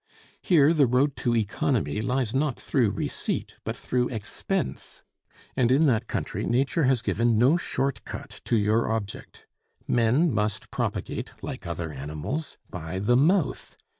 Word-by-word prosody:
Here 160 -3 +5
the 145 -5 +4
road 130 +3 +2
to 120 -1 +1
economy 110 +1 0
lies 125 -1 0
not 135 -1 0
through 125 -6 +1
receipt, - - -3
but - - -4
through 125 -1 0
expense; 110 -5 -4 0.5
and 120 -2 +3
in 145 +5 +5
that 120 -7 +2
country - - -3
nature 135 +5 +1
has 125 -3 +2
given 115 -1 +2
no 130 +8 +5
short 135 - -1
cut - - -8
to 115 - +2
your 110 +2 +2
object. 110 -3 -5 0.4
Men 125 +7 +3
must 105 0 -2
propagate, - - -3
like - - -6
other 85 -2 -4
animals, 75 - -5
by 85 0 -6
the 105 +6 +2
mouth. 160 +4 +1
120 Hz, 145 wpm, -26 LUFS, 105-135 Hz, 0.5 s, Here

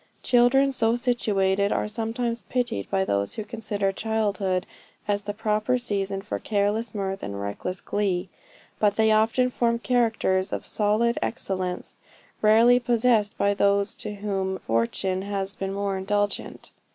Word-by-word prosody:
Children 260 +3 +4
so 230 -3 +1
situated 200 -5 +1
are - - 0
sometimes 230 +2 -2
pitied 245 - -1
by 190 0 +1
those 100 - -1
who 215 - -3
consider 210 -3 -2
childhood 200 -3 -1 0.4
as 205 0 +1
the 205 0 -4
proper 215 +3 +1
season 195 -4 -2
for 210 - -4
careless 210 +2 -1
mirth 195 -1 -3
and 100 0 -5
reckless 100 - -4
glee; 195 -3 -1 0.5
but 205 -1 +3
they 220 0 +3
often 225 +4 +3
form 235 -1 +1
characters 220 -6 +1
of - - -4
solid 215 +3 +1
excellence 185 -4 -3 0.4
rarely 230 +3 +6
possessed 230 -3 +2
by 200 0 +2
those 200 0 +2
to 210 -1 -6
whom 195 -2 -2
fortune 150 - -1
has 195 0 -3
been 195 -2 -4
more 200 0 -2
indulgent. 205 +1 -2
205 Hz, 140 wpm, -25 LUFS, 195-230 Hz, 0.5 s, rarely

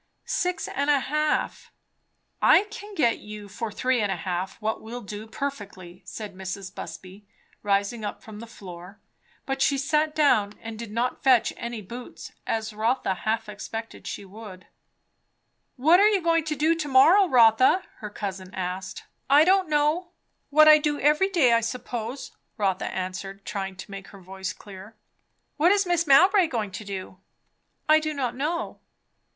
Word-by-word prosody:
"Six 360 0 -1
and 285 +1 -2
a 290 -1 +4
half." 305 +3 -1 0.7
"I - - +6
can 420 -2 -9
get 240 -9 +2
you 210 -1 -9
for 210 +3 -5
three 250 +3 0
and 205 -2 0
a - - 0
half 180 +1 -4
what 220 0 -2
will 240 +3 -7
do 210 +1 -8
perfectly," 200 -9 -7
said 210 -3 -7
Mrs. 190 0 -7
Busby, 195 +2 -10 0.3
rising 200 +2 0
up 205 - -5
from 215 -1 -10
the 230 - -9
floor. 185 -2 -11 0.5
But 270 0 -3
she 280 - +3
sat 300 +2 0
down, 215 -9 +3
and 225 -1 -8
did 235 -2 -6
not 235 +3 -2
fetch 255 -4 +4
any 235 -2 -6
boots, 240 +6 -9 0.2
as 220 -1 -2
Rotha 225 0 0
half 220 +4 -2
expected 225 +2 -7
she 200 - -6
would. 195 -2 -11 1.1
"What 315 +7 +5
are 415 +1 +6
you 410 -2 +2
going 330 -1 +2
to 305 -1 -2
do 310 +3 +2
to 320 -3 -4
morrow, 325 +9 +6
Rotha?" 250 +6 +5
her 210 - -7
cousin 190 -2 -6
asked. 185 0 -5 0.3
"I 285 +2 +7
don't 375 0 +3
know. 305 +4 +1 0.4
What 310 +1 +6
I 305 0 +9
do 295 -1 -1
every 300 +7 +3
day, 305 -11 +3
I 230 - +3
suppose," 240 +1 -5 0.3
Rotha 195 -3 0
answered, 190 +1 -6
trying 195 -1 -4
to 185 +2 -10
make 195 -1 -8
her 200 - -13
voice 190 +1 -6
clear. 200 +2 -12 0.6
"What 330 +4 +4
is 405 -1 +3
Mrs. 345 -2 0
Mowbray 370 +6 +6
going 220 -8 -3
to 205 - -7
do?" 190 -2 -7 0.7
"I 310 0 +6
do 310 -1 -3
not 255 -4 -2
know." 310 +6 -3
230 Hz, 170 wpm, -25 LUFS, 200-300 Hz, 1.1 s, I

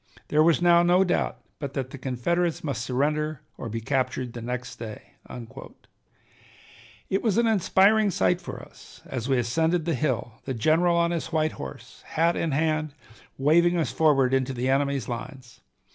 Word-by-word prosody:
There 150 - +3
was 170 +2 +3
now 170 -1 +6
no 175 +2 +4
doubt 180 -1 -1 0.2
but 140 -2 -5
that 130 -1 -3
the 140 - -8
Confederates 160 +7 -1
must 135 -6 -3
surrender 150 +3 -1
or 115 - -6
be 115 +1 -4
captured 130 0 -1
the 120 - -7
next 125 +1 -5
day." 110 -2 -9 2.0
It 195 - 0
was 220 -4 +1
an 235 - +3
inspiring 210 0 +4
sight 180 -1 +1
for 175 - -8
us, - - -16
as 125 0 -5
we 135 - +3
ascended 160 +8 +1
the 170 - 0
hill, 125 -5 -2
the 130 - -3
general 165 +8 +3
on 170 0 +2
his 170 -2 -2
white 155 -1 +1
horse, 65 -1 -10
hat 165 +2 +1
in 165 - -1
hand, 155 0 0 0.4
waving 170 +5 +3
us 165 - 0
forward 135 -5 +3
into 135 0 +1
the 125 +1 -2
enemy's 140 0 0
lines. 125 +1 -8
150 Hz, 170 wpm, -26 LUFS, 130-170 Hz, 2.0 s, now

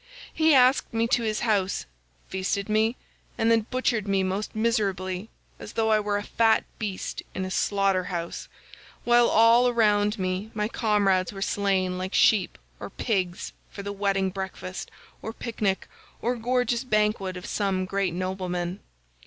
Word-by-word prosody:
He 315 -2 +4
asked 255 +1 +4
me 225 0 +2
to 245 - +3
his 215 -2 -1
house, 200 -4 0 0.4
feasted 190 +1 -2
me, 220 +2 +2 0.4
and 225 -1 +2
then 225 -1 +2
butchered 240 -5 0
me 195 -1 +2
most 195 +4 -3
miserably 200 -3 -1 0.3
as - - -9
though 220 -1 +1
I 215 - +4
were 205 -1 -1
a 205 - -3
fat 225 +1 +2 0.2
beast 205 -4 -4
in 185 - -2
a 185 - -5
slaughter 195 -2 +1
house, 170 -2 -5 0.6
while 240 0 +5
all 230 +3 +5
around 210 -2 +2
me 185 +2 -2
my 210 -1 0
comrades 205 -5 +1
were 195 - -8
slain 190 -3 0
like 185 +1 -4
sheep 200 -5 +3 0.2
or - - -6
pigs 190 -6 -2 0.2
for 200 - -8
the 200 0 -4
wedding 195 -1 0
breakfast, 190 -1 -6 0.3
or 220 - -5
picnic, 215 -5 -2 0.3
or 245 +2 0
gorgeous 245 0 0
banquet 210 -5 0
of 180 - -8
some 195 -2 -1
great 190 -2 -1
nobleman. 185 0 -3
205 Hz, 155 wpm, -26 LUFS, 190-225 Hz, 0.6 s, while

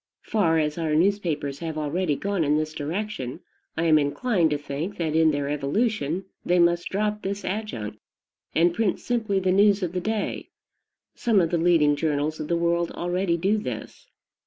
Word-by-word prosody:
Far 170 -7 +2
as 150 +1 0
our 155 -2 0
newspapers 160 -6 0
have 160 -2 -4
already 155 +1 0
gone 200 +1 -1
in 150 0 +2
this 155 0 -2
direction, 155 - -4 0.4
I 165 - +1
am 155 -2 +5
inclined 170 - +1
to 150 - 0
think 145 +7 -5
that 160 -3 -1
in 160 0 +5
their 145 -2 -1
evolution 165 - -1 0.2
they 180 - +2
must 170 0 +3
drop 210 +1 -1
this 200 +1 -4
adjunct, 185 - -4 0.6
and 170 +1 +4
print 210 -1 0
simply 220 -5 0
the 185 -1 +1
news 200 +1 +4
of 175 - -1
the 180 0 -2
day. 215 +1 -3 0.6
Some 225 -4 +2
of 165 -3 +1
the 170 - +1
leading 160 -4 +4
journals 150 0 -1
of 155 - -4
the 170 - +1
world 170 0 +1
already 175 0 0
do 195 +5 +1
this. - - -7
170 Hz, 180 wpm, -25 LUFS, 155-200 Hz, 0.6 s, am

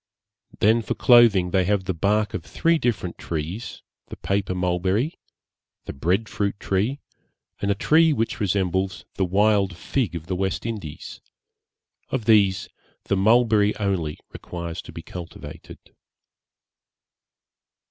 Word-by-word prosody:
Then 110 +3 +3
for - - -3
clothing 115 -7 +5
they 95 0 +3
have 100 0 +1
the 95 0 -2
bark 105 +5 +1
of 85 - -4
three 165 0 +1
different 100 - -2
trees, 85 +7 -5 0.2
the - - -8
paper 100 -1 -1
mulberry, 95 - 0 0.7
the - - -6
bread 95 +10 0
fruit 100 -3 -2
tree, 105 +9 -1 0.6
and 100 - -1
a 100 - +2
tree 160 +9 +4
which 115 -3 -1
resembles 95 -2 -1
the 95 - 0
wild 100 -1 +2
fig 110 +4 -2
tree - - -2
of 80 - -19
the 95 +2 -3
West 95 +3 -2
Indies; 105 -10 -6 0.9
of 125 -5 -2
these 100 -4 +4 0.4
the 100 - 0
mulberry 110 0 +3
only 95 -7 -1
requires 85 -1 -6
to - - -12
be - - -9
cultivated. 85 -2 -9
100 Hz, 135 wpm, -23 LUFS, 90-110 Hz, 0.9 s, clothing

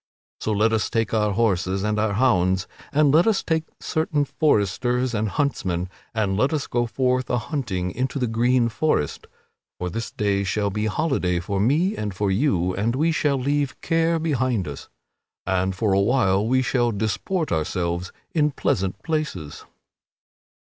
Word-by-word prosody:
So 110 - -2
let 110 +2 +2
us 110 - +1
take 115 -2 -1
our 105 -2 +2
horses 95 -3 +1
and 105 0 0
our 105 -1 +1
hounds 95 -6 +2 0.2
and 145 -1 +4
let 165 +6 +5
us 215 -3 +2
take 160 -1 0
certain 155 -2 0
foresters 125 -1 +1
and 110 -1 0
huntsmen, 95 - -1 0.3
and 100 -3 +1
let 130 +9 +1
us 150 -2 -1
go 120 0 0
forth 130 +1 0
a 125 - +1
hunting 110 - -3
into 130 +6 -2
the 130 - +1
green 120 +2 +2
forest; 115 - -1 0.5
for 90 -1 -4
this 115 +1 -4
day 100 -1 0
shall 100 +1 0
be 105 +2 -1
holiday 105 - 0
for 95 +3 -2
me 155 - +2
and 105 -3 -4
for 100 0 0
you 95 - +1
and 115 +5 0
we 160 +5 +2
shall 145 -3 +1
leave 140 +1 -1
care 165 0 +2
behind 130 - 0
us, 70 -2 -8 0.6
and 95 0 0
for 100 0 +1
a 100 - +3
while 105 -3 +2
we 130 +2 +2
shall 120 -1 +1
disport 110 - -2
ourselves 85 +2 -1 0.2
in 150 -2 +2
pleasant 95 -8 -1
places." 150 - -3
115 Hz, 165 wpm, -23 LUFS, 95-140 Hz, 0.6 s, let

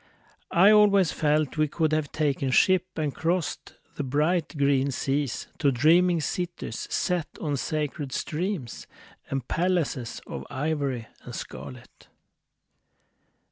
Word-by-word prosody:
I 190 +5 +6
always 200 -5 +5
felt 150 -1 +1
we 155 0 +3
could 155 +1 0
have 155 -2 0
taken 140 -3 0
ship 185 +6 +3
And 150 -3 -1
crossed 170 0 -2 0.2
the 145 - -1
bright 155 +5 0
green 140 -1 +2
seas 135 0 -1
To 145 -3 +3
dreaming 165 +6 +4
cities 175 -8 -4
set 175 -4 0
on 145 -3 -1
sacred 150 0 -3
streams 160 - -3 0.4
And 135 -3 -3
palaces 165 -9 -1
Of - - -7
ivory 140 -4 -2 0.2
and - - -8
scarlet. 65 0 -9
150 Hz, 120 wpm, -26 LUFS, 140-175 Hz, 0.4 s, I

